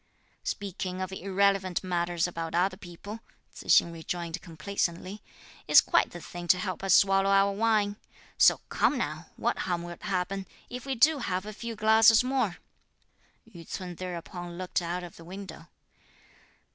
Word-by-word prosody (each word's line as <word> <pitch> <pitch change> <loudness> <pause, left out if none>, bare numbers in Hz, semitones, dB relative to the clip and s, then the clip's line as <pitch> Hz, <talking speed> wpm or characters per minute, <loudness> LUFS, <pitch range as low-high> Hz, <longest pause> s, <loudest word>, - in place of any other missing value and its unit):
"Speaking 185 -2 -4
of 185 0 -3
irrelevant 195 -1 +1
matters 175 -2 0
about 165 -1 -5
other 185 +2 +2
people," 195 +4 -9 0.3
Tzu - - -11
hsing 170 - +5
rejoined 170 +1 -5
complacently, 180 +3 -3 0.5
"is - - +9
quite - - +2
the 175 - -9
thing 175 +1 -8
to 180 - +5
help 185 0 -4
us 195 -2 +5
swallow 195 0 +4
our 195 0 +4
wine; 210 -1 +1 0.4
so - - +5
come - - +2
now; - - -3
what - - -1
harm 175 -2 -2
will 175 0 -7
happen, 195 -1 -2 0.2
if 250 +2 -7
we 270 - -1
do 290 +5 +4
have 185 -5 -2
a 215 - -6
few 230 +2 -6
glasses 220 +1 +6
more." 250 -8 0 0.9
Yü 175 -7 -12
ts'un 180 -2 -5
thereupon 175 0 -7
looked 185 0 -2
out 175 +1 -3
of 175 - -10
the 165 - -12
window. 180 -2 -9
185 Hz, 160 wpm, -28 LUFS, 175-205 Hz, 0.9 s, is